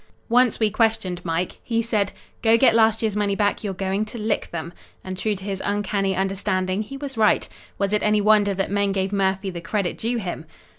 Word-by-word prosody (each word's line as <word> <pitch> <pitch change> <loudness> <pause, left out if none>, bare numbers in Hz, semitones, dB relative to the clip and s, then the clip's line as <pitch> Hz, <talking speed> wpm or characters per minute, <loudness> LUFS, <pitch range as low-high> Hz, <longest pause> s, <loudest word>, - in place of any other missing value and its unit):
Once 245 0 +3
we 215 -2 +2
questioned 195 -5 0
Mike. 170 +1 -2
He 230 -1 0
said, 210 -4 0 0.3
"Go 225 0 +5
get 235 -1 +5
last 225 0 +3
year's 215 -2 0
money 205 -1 +1
back, 205 +1 0
you're 195 -3 -3
going 195 +2 -1
to 215 - -8
lick 215 -1 -1
them!" 170 0 -5 0.3
And 185 0 -5
true 210 +3 -1
to 190 - -9
his 195 -1 -4
uncanny 200 -1 0
understanding 190 0 -1
he 270 +6 -7
was 275 -3 -6
right. 215 -1 +3 0.3
Was 200 +1 0
it 210 - +2
any 210 0 +3
wonder 205 -1 +4
that 195 0 -2
men 200 -1 +1
gave 190 0 -1
Murphy 195 0 0
the 170 -1 -6
credit 195 0 -2
due 235 +2 -1
him? 175 -6 -5
205 Hz, 210 wpm, -23 LUFS, 190-220 Hz, 0.3 s, Go